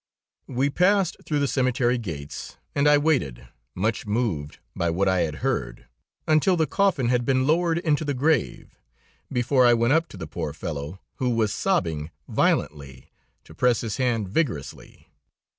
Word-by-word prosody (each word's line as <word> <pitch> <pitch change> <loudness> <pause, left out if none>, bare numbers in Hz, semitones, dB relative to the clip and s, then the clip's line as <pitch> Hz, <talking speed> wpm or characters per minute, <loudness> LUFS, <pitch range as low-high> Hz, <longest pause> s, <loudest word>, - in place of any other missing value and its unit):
We 135 +2 0
passed 185 +3 +2
through 150 - 0
the 140 -1 +1
cemetery 125 -2 +1
gates 75 -10 -7 0.2
and 140 +1 +2
I 150 0 +6
waited, 135 - 0 0.3
much 105 +3 -1
moved 105 -10 -2 0.2
by 85 - 0
what 95 +4 0
I 95 -1 +2
had 80 -3 -1
heard, - - -2 0.4
until 155 +4 +3
the 160 - +2
coffin 180 - +1
had 125 -1 +2
been 130 +1 +1
lowered 165 +2 +2
into 160 -3 0
the 145 -2 -2
grave, 145 0 0 0.6
before 125 +2 +2
I 120 -1 +6
went 115 +3 +2
up 165 +2 +2
to - - -12
the - - -6
poor 75 - -5
fellow 80 +1 -6 0.2
who 125 - 0
was 110 -3 +1
sobbing 80 - -1 0.2
violently, 70 -4 -1 0.3
to - - -15
press 125 +7 +2
his 110 -4 -4
hand 120 -5 0
vigorously. 100 - -3
125 Hz, 160 wpm, -24 LUFS, 90-145 Hz, 0.6 s, I